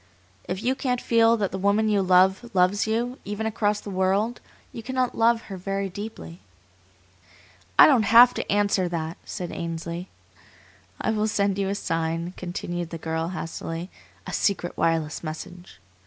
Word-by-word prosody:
"If 185 Hz, +3 st, -4 dB
you 255 Hz, -, +2 dB
can't 250 Hz, -2 st, -1 dB
feel 230 Hz, -1 st, +3 dB
that 200 Hz, -3 st, -1 dB
the 190 Hz, -, -4 dB
woman 200 Hz, +3 st, +2 dB
you 205 Hz, -2 st, +2 dB
love 190 Hz, +5 st, +3 dB
loves 185 Hz, +4 st, +3 dB
you, 240 Hz, +3 st, -1 dB
even 205 Hz, +2 st, -4 dB
across 210 Hz, -1 st, 0 dB
the 205 Hz, -, -8 dB
world, 195 Hz, +5 st, 0 dB, 0.3 s
you 230 Hz, -, -6 dB
cannot 255 Hz, +1 st, -1 dB
love 230 Hz, 0 st, +3 dB
her 195 Hz, -, -8 dB
very 195 Hz, +1 st, -3 dB
deeply." 180 Hz, -, -8 dB, 1.4 s
"I -, -, +10 dB
don't 265 Hz, -6 st, +5 dB
have 240 Hz, +2 st, +8 dB
to -, -, -4 dB
answer 200 Hz, -3 st, +2 dB
that!" 165 Hz, -1 st, -4 dB
said 175 Hz, -2 st, -5 dB
Ainsley. 170 Hz, +1 st, -5 dB, 0.9 s
"I -, -, 0 dB
will 215 Hz, 0 st, 0 dB
send 200 Hz, -2 st, 0 dB
you 195 Hz, -1 st, 0 dB
a 200 Hz, -, -1 dB
sign," 165 Hz, -1 st, -2 dB
continued 175 Hz, -1 st, -5 dB
the 165 Hz, -, -6 dB
girl, 160 Hz, 0 st, -2 dB
hastily; 165 Hz, 0 st, -5 dB, 0.3 s
"a -, -, -6 dB
secret 190 Hz, -4 st, 0 dB
wireless 165 Hz, -2 st, 0 dB
message. 175 Hz, -, -8 dB
195 Hz, 160 wpm, -25 LUFS, 175-220 Hz, 1.4 s, I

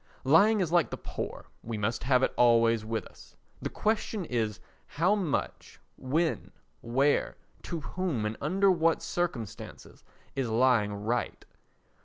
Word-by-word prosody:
Lying 200 Hz, +10 st, +5 dB
is 170 Hz, -3 st, -1 dB
like 170 Hz, -3 st, +3 dB
the -, -, -5 dB
poor, -, -, -6 dB, 0.2 s
we 115 Hz, -1 st, -5 dB
must 110 Hz, +3 st, -2 dB
have 130 Hz, -1 st, +3 dB
it -, -, +1 dB
always 115 Hz, -2 st, +4 dB
with 110 Hz, -2 st, -3 dB
us. 65 Hz, 0 st, -16 dB, 0.3 s
The -, -, -3 dB
question 215 Hz, -2 st, -1 dB
is, 110 Hz, -6 st, -2 dB, 0.3 s
How 170 Hz, +7 st, +1 dB
much, 190 Hz, -8 st, -3 dB, 0.2 s
when, 155 Hz, +5 st, -1 dB, 0.3 s
where, 135 Hz, +5 st, +1 dB, 0.2 s
to 170 Hz, -3 st, -5 dB
whom 155 Hz, -8 st, -2 dB
and 105 Hz, +1 st, -2 dB
under 190 Hz, +6 st, +3 dB
what 165 Hz, -2 st, +2 dB
circumstances 140 Hz, -, -5 dB, 0.3 s
is 130 Hz, -3 st, -1 dB
lying 115 Hz, -2 st, +3 dB
right? 110 Hz, +4 st, -3 dB
130 Hz, 140 wpm, -29 LUFS, 115-170 Hz, 0.3 s, Lying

